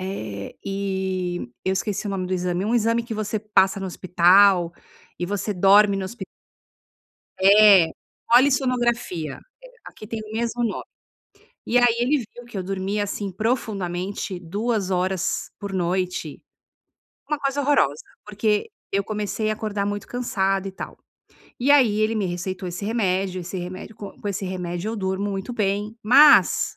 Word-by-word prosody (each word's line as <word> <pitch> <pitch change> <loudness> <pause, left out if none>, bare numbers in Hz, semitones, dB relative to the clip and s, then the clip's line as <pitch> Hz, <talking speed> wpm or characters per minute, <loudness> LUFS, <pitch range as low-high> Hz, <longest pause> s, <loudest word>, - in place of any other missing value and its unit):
eh, 110 - -6
e 190 -6 -3
eu 190 - +1
esqueci 200 +2 -2
o - - -2
nome 185 -2 -2
do 185 - -4
exame, 180 +1 -1
um 230 +3 0
exame 230 0 +2
que 230 -1 -6
você 215 0 -2
passa 195 -2 +2
no 195 - -3
hospital 180 0 +4 0.5
e 175 - -2
você 205 +1 -2
dorme 200 +2 +5
no 190 - -3
hospi 235 +6 -7 1.2
É! 200 -3 +7 0.4
Polissonografia, 240 - +2 0.2
é, - - -11 0.2
aqui 215 - -11
tem 225 -1 -4
o 215 - -11
mesmo 235 +1 -1
nome. 220 - -2 0.8
E 245 - +3
aí 245 -1 +4
ele 260 +5 +2 0.2
viu 245 - -11
que 235 -4 -10
eu 190 - -2
dormia, 195 +2 -2
assim, 200 -1 -4
profundamente, 195 -4 -2
2 200 +3 -2
horas 185 0 -1
por 200 -1 -6
noite. 180 -3 -2 0.9
Uma 300 - -1
coisa 275 0 -1
horrorosa. 265 - +2 0.2
Porque 210 - 0 0.2
eu 200 0 +1
comecei 215 +1 -2
a 215 - +1
acordar 210 -2 -3
muito 205 0 -4
cansada 195 -5 -1
e - - -5
tal, 190 - -8 0.6
e 275 +3 +2
aí 235 -7 +5
ele 220 +1 +1
me 200 -3 0
receitou 180 +2 -4
esse 180 +3 -6
remédio, 190 -4 0
esse 180 +2 -6
remédio 185 +4 -7
co 200 -1 -9
com - - -7
esse 195 0 -3
remédio 180 +1 -4
eu 230 - -4
durmo 190 0 -2
muito 195 +5 -4
bem, 210 -1 -1
mas, 280 +7 +6
200 Hz, 160 wpm, -23 LUFS, 185-220 Hz, 1.2 s, É